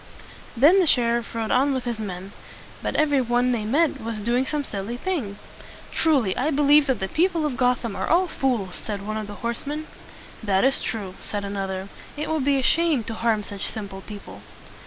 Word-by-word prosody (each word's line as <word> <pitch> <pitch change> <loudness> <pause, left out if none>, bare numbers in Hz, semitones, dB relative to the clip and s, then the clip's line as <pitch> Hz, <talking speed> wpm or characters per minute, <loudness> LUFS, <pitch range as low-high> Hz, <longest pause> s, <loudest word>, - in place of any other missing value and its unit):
Then 310 +10 +7
the 360 - +3
sheriff 235 -3 +2
rode 225 -1 -2
on 270 +2 +3
with 260 - -2
his 235 -2 -3
men; 190 -2 -6 0.5
but - - -3
every 290 -3 +3
one 245 +1 +2
that 240 - +1
they 210 - -4
met 290 +8 +2
was 225 -1 -3
doing 240 +5 +1
some 300 -1 -1
silly 215 0 -5
thing. 255 - -3 0.5
"Truly 270 -12 +2
I 270 +5 0
believe 290 0 +5
that 260 -5 +1
the 190 - -1
people 335 - +1
of 290 -4 -1
Gotham 250 -4 +1
are - - -2
all 360 +3 +3
fools," 240 - -1
said 200 -2 -5
one 215 +1 -3
of 215 -1 -4
the 205 - -8
horsemen. 290 +6 -3 0.6
"That 195 -3 +2
is 270 +1 +2
true," 200 -5 -4
said 205 -1 -3
another. 195 -1 -3 0.3
"It 300 +1 -2
would 315 -3 0
be 280 0 +3
a 265 - 0
shame 325 -4 +3
to 225 - -5
harm 220 -2 +1
such 200 -1 -5
simple 200 -3 -7
people." 205 0 -10
240 Hz, 200 wpm, -24 LUFS, 205-285 Hz, 0.6 s, Then